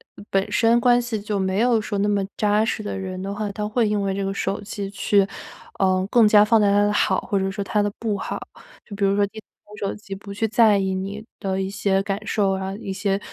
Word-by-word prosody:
呃， - - -12
本 195 0 0
身 230 +1 +4
关 245 0 +4
系 235 -3 -3
就 205 0 -3
没 190 +1 0
有 240 -1 +3
说 210 -1 -3
那 205 +1 +1
么 200 -1 +1
扎 210 0 +2
实 215 - -2
的 205 - -4
人 185 -1 -5
的 195 +1 -4
话， 210 0 -3
他 210 +1 -3
会 220 +1 +1
因 210 -1 0
为 195 -1 -1
这 195 +1 -2
个 195 0 -2
手 195 0 -2
机 200 -1 -5
去， 200 0 +2 0.5
呃， 185 -1 +2
更 235 -3 +6
加 210 0 +7
放 220 +1 +4
大 210 - +3
他 205 +1 +4
的 205 - +2
好， 210 - +2
或 200 - -1
者 190 0 0
说 195 +1 -4
他 210 +1 0
的 205 - +1
不 215 -3 -2
好。 - - -4 0.5
就 210 - -11
比 200 - +1
如 195 0 +2
说 205 0 +3
低 220 +2 -10
头 - - -17 0.3
玩 210 - -11
手 200 - -3
机 200 -2 -9
不 200 +1 -8
去 210 +3 -1
在 220 -1 +4
意 190 -1 0
你 200 +3 -5
的 195 -1 -2
一 190 - -2
些 195 -1 0
感 200 0 -2
受 200 -2 +1
啊、 190 0 -3
一 200 -2 -6
些 195 0 -1
200 Hz, 285 characters per minute, -23 LUFS, 195-210 Hz, 0.5 s, 加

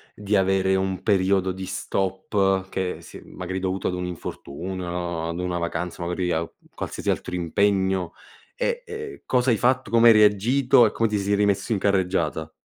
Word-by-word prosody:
di 105 0 -1
avere 95 0 +2
un 95 -1 -1
periodo 95 -2 +2
di 95 +1 -6
stop 95 0 -1
che 95 -2 -2
si - - -11
è - - -13
magari 95 +1 -5
dovuto 95 0 -2
ad - - -1
un 90 0 -3
infortunio 90 +1 -6
o 85 -2 -3
ad 85 +1 -4
una 90 -1 -2
vacanza 85 +1 -4
magari 90 +1 -1
a 80 0 -1 0.2
qualsiasi - - -4
altro - - -3
impegno, 95 0 +1 0.4
e - - -1
e 440 -2 -8
cosa 125 0 +2
hai 115 - +2
fatto, 125 0 +1
come 115 0 +6
hai - - +9
reagito 120 +5 +4
e - - -3
come 115 -1 0
ti 105 - 0
sei 100 +1 +1
rimesso 100 +1 +1
in 105 - +1
carreggiata? 90 -5 0
95 Hz, 180 wpm, -24 LUFS, 90-105 Hz, 0.4 s, hai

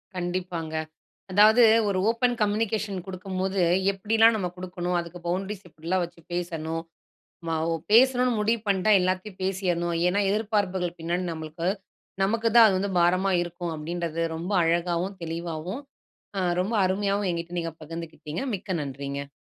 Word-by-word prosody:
கண்டிப்பாங்க. 175 -3 -3 0.6
அதாவது 215 +5 +7 0.3
ஒரு 195 -2 0
ஓப்பன் 245 +1 +2
கம்யூனிகேஷன் 210 -1 0
குடுக்கும்போது, 190 0 -2 0.3
எப்படில்லாம் 225 +3 +4
நம்ம 180 -4 -1
கொடுக்கணும், 180 -1 -3
அதுக்கு 170 +1 -9
பவுண்ட்ரீஸ் 190 +2 -3
எப்படில்லாம் 170 +3 -2
வச்சு 170 0 -11
பேசணும். 165 -2 -3 0.6
நம்ம 165 -1 -2
ஓ - - +1 0.2
பேசணும்னு 250 +1 +5
முடிவு 225 +2 +1
பண்ணிட்டா, 200 +2 +3
எல்லாத்தையும் 185 +2 -2
பேசிறணும். 180 -3 0
ஏன்னா, 200 +3 +1
எதிர்பார்ப்புகள் 200 -4 0
பின்னாடி 175 +2 -1
நம்மளுக்கு 160 +2 -4 0.5
நமக்கு 225 +3 +2
தான் 230 -1 +10
அது 195 -3 +3
வந்து 200 +1 -1
பாரமா 185 +3 +3
இருக்கும், 175 -1 -5
அப்படீன்றத 165 +1 -3
ரொம்ப 175 +5 -4
அழகாவும், 175 +3 0
தெளிவாவும் 170 - -4 0.6
அ - - +1 0.2
ரொம்ப 210 +5 -1
அருமையாவும் 200 +1 0
என்கிட்ட 170 0 -5
நீங்க 165 -1 -4
பகிர்ந்துக்கிட்டீங்க. 165 0 -6
மிக்க 190 -1 -5
நன்றிங்க. 140 0 -5
185 Hz, 135 wpm, -26 LUFS, 170-200 Hz, 0.6 s, தான்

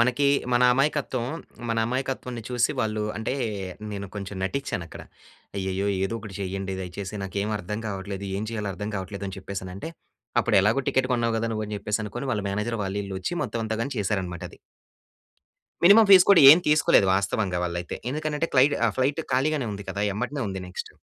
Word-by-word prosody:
మనకి 125 +4 +3 0.3
మన 120 0 +4
అమాయకత్వం, 135 -2 0 0.4
మన 115 0 0
అమాయకత్వాన్ని 125 -2 -3
చూసి 120 +1 +2
వాళ్ళు 110 -1 -1
అంటే 110 +3 -2 0.6
నేను 100 0 -5
కొంచెం 100 -1 -6
నటించాను 95 -5 -2
అక్కడ. - - -10 0.5
అయ్యయ్యో! 95 +1 -1 0.2
ఏదో 105 - -2
ఒకటి 105 -3 -9
చేయండి 95 0 -3
దయచేసి 95 +3 -6
నాకేమి 100 +3 -2
అర్థం 105 +3 -5
కావట్లేదు. 100 0 -5
ఏం 105 - -3
చేయాలో 105 -3 -3
అర్థం 105 +1 -5
కావట్లేదు 100 +1 -5
అని 95 - -7
చెప్పేసి 95 0 -6
అనంటే, 95 - -7 0.5
అప్పుడు - - +2
ఎలాగో 110 +7 +2
టికెట్ 130 -1 +1
కొన్నావు 115 -1 0
కదా 115 +1 -1
నువ్వు, 110 -1 -2
అని 105 - -5
చెప్పేసి 105 +2 -2
అనుకోని 120 +6 -5
వాళ్ళ 105 -2 -2
మేనేజర్ 105 +3 -2
వాళ్ళ 95 0 -3
ఈల్లు 95 -1 -5
వచ్చి 95 - -3
మొత్తం 115 - -3
అంతా 110 - -2
గాని 140 +3 -3
చేశారనమాట 95 -4 -2
అది. - - -16 1.3
మినిమం 210 +5 +8
ఫీస్ 185 -2 +9
కూడా 190 - +8
ఏమి 170 +4 +7
తీసుకోలేదు 150 -9 +5
వాస్తవంగా 95 -2 0
వాళ్ళైతే. 85 0 -4
ఎందుకనంటే 155 +2 -2
క్లైడ్ 140 +3 +5
ఆహ్, 105 - 0
ఫ్లైట్ 140 +5 +1
ఖాళీగానే 135 -1 +1
ఉంది 100 0 -7
కదా! 100 - -2
ఎమ్మటినే 125 +6 -3
ఉంది 95 -1 -5
నెక్స్ట్. 90 - -7
105 Hz, 180 wpm, -25 LUFS, 95-130 Hz, 1.3 s, ఫీస్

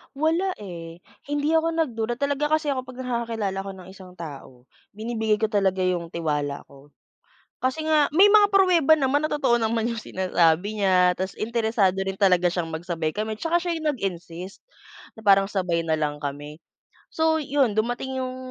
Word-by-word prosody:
Wala 330 +6 0
eh. 170 -3 -9 0.2
Hindi 290 +1 0
ako 325 0 +2
nagduda. 240 -7 -1
Talaga 285 +2 -1
kasi 305 -2 -1
ako 255 -1 -3
'pag 255 0 -8
nakakakilala 230 -5 -2
ako 195 0 -5
ng 185 -1 -12
isang 185 -2 -14
tao, 140 -6 -10 0.3
binibigay 220 -1 0
ko 220 +1 -1
talaga 190 -2 +1
yung 175 -2 -1
tiwala 150 -4 -3
ko. 140 +1 -16 0.7
Kasi 260 +5 -1
nga, 310 -2 +3
may 395 +5 +7
mga 410 -1 +5
pruweba 355 -6 +5
naman 290 0 +2
na - - -4
totoo 265 -5 +2
naman 225 0 0
yung 230 - -4
sinasabi 185 0 +1
niya. 180 -2 +3
Tapos, 190 +1 -3
interesado 220 -4 0
rin 195 - -2
talaga 185 -3 +3
siyang 175 -2 0
magsabay 165 -1 -3
kami. 215 +5 -3
Tsaka 335 +1 +2
siya 345 0 -2
yung 315 -2 -1
nag-insist, 185 - -5 0.6
na 220 - -13
parang 195 0 +5
sabay 180 -4 0
na 160 -1 0
lang 150 -1 -2
kami. 145 +2 -6 0.5
So, 320 0 +2
yun, 270 -6 +1
dumating 245 +4 -2
yung 255 0 -5
215 Hz, 170 wpm, -24 LUFS, 180-280 Hz, 0.7 s, may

